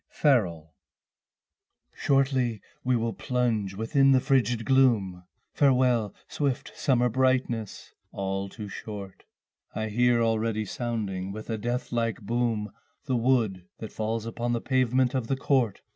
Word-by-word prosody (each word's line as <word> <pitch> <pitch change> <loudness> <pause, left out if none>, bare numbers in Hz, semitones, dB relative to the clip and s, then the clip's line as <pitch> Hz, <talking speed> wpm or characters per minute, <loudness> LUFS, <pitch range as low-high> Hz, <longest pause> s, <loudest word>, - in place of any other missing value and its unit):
Autumn 145 - +8 0.2
Song 80 -2 -11
I 80 - -43
Shortly 130 -5 +1 0.2
we 125 0 +2
will 115 -1 -1
plunge 115 -7 -1
within 135 +6 +3
the 130 - +5
frigid 125 -4 +1
gloom, 110 -10 +2 0.3
Farewell 125 -6 +2
swift 140 -4 -2
summer 125 -3 +2
brightness; 125 -3 -1 0.2
all 95 0 -3
too 105 +1 -8
short 100 -1 -8 0.5
I 110 0 -2
hear 120 +2 +3
already 110 -1 0
sounding 100 -5 -3
with 110 +3 -7
a 110 - -1
death 120 +3 -3
like 115 -1 -1
boom 115 -1 -1 0.3
The 130 - 0
wood 115 -7 +1
that 110 - -8
falls 110 +1 -2
upon 120 +1 -2
the 120 - 0
pavement 130 -1 +2
of 130 -4 -1
the 135 - 0
court. 130 -6 +1
115 Hz, 140 wpm, -27 LUFS, 105-130 Hz, 0.5 s, Autumn